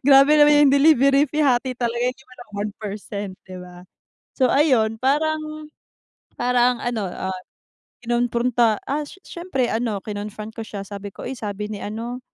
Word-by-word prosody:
Grabe 275 +1 +7
naman 295 -1 +6
yung - - +3
delivery 275 -1 +5
fee 305 +1 0
hati 255 -1 +2
talaga 235 -1 -2
'di 255 - -15
man 255 - -17
lang 240 - -12
1%, 205 -1 -5
'di 185 - -8
ba? 180 0 -12 0.5
So 260 -2 +3
ayun 250 -7 +3
parang, 310 +2 -1 0.7
parang 245 0 +2
ano, 230 -5 -2
ah, 185 0 -4 0.6
kinompronta, 240 -1 +1
ah, 295 +2 -1
s 290 - -13
syempre 340 -8 -2
ano 225 -3 -1
kinon-front 210 +1 -6
ko 225 - -4
siya 205 -3 -6
sabi 200 0 -7
ko, - - -9
"Uy 265 - -4
sabi 210 -1 -4
ni 205 - -5
ano, 230 +4 -5
240 Hz, 160 wpm, -22 LUFS, 210-275 Hz, 0.7 s, Grabe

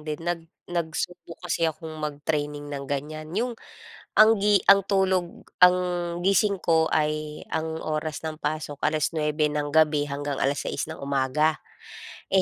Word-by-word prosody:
din 150 0 -4
nag 175 -1 -1 0.3
nagsubok 170 0 -4
kasi 170 -1 0
akong 160 0 -7
mag-training 145 -1 -3
ng 140 -1 -4
ganiyan 155 +2 -4
'yong 240 +3 0 0.6
ang 220 +1 +7
gi 205 0 +3
ang 200 -1 +7
tulog 190 -3 0 0.2
ang 180 0 +7 0.4
gising 195 +1 +2
ko, 160 -1 +2
ay 155 0 -1
ang 160 0 -3
oras 155 0 -3
ng 160 -1 -5
pasok, 150 -1 -3
9:00 150 0 +1
ng 150 -1 -2
gabi 155 -2 +4
hanggang 145 0 -4
6:00 140 +2 -1
ng 160 +1 -8
umaga. 140 +3 +1 0.8
Eh, 190 - +6
155 Hz, 140 wpm, -25 LUFS, 150-175 Hz, 0.8 s, ang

